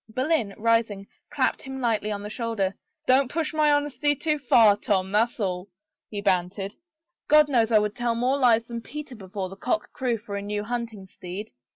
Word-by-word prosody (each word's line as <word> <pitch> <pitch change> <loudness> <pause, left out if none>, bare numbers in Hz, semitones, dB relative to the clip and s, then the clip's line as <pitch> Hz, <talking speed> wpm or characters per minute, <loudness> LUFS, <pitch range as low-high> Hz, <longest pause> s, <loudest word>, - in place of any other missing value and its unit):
" - - -39
Boleyn, 255 -3 0
rising, 225 -3 +1 0.2
clapped 290 -3 0
him 265 0 -7
lightly 225 -4 0
on 205 -1 -4
the 210 - -5
shoulder.. 220 -5 -1 0.3
Don't 260 -1 +4
push 320 -1 -2
my 305 -1 +3
honesty 290 0 +1
too 305 +1 -1
far, 230 -6 +5
Tom, 190 -2 0
that's 225 +4 +1
all," 185 -1 -2 0.4
he 205 -1 -4
bantered. 195 +1 0 0.3
" 345 - -57
God 300 0 +6
knows 235 -5 +2
I 220 - +6
would 210 0 0
tell 240 -1 0
onore 255 +4 +1
lies 230 -2 +4
than 235 -1 -6
Peter 295 +2 -8
before 195 -2 -5
the 190 - -10
cock 250 +11 -2
crew 250 -4 -1
for 205 -1 -7
a 200 - -3
new 205 +1 -3
hunting 230 -3 -4
steed. 190 +3 -8
230 Hz, 200 wpm, -25 LUFS, 205-265 Hz, 0.4 s, God